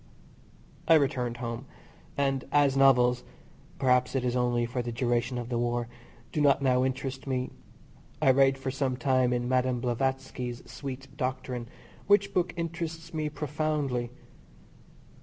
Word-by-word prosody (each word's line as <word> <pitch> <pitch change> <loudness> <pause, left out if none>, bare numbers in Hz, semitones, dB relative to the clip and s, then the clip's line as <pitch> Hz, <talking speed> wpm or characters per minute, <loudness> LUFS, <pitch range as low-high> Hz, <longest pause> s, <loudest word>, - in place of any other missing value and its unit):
I 165 - +7
returned 130 -5 +1
home, 120 +2 -5 0.5
and 135 -2 +1
as 145 -2 +4
novels 125 -2 +5 0.5
(perhaps 125 -1 +2
it 130 -1 0
is 125 0 0
only 120 -1 +1
for 125 +1 -2
the 120 0 -4
duration 120 +1 0
of 120 -1 -5
the 120 -2 -1
war) 120 0 0 0.4
do 150 - -1
not 140 -1 +5
now 130 -2 +3
interest 130 +1 -3
me 130 -1 -1 0.7
I 135 - +5
read 135 0 +4
for 135 0 -3
some 130 -1 -1
time 130 0 +2
in 120 0 0
Madame 130 -1 +1
Blavatsky's 125 0 -2
"Secret 135 -1 -7
Doctrine," 130 -2 -3 0.4
which 200 0 +4
book 180 -1 +1
interests 165 0 -4
me 155 -1 -1
profoundly. 150 -4 -2
130 Hz, 140 wpm, -28 LUFS, 125-140 Hz, 0.7 s, I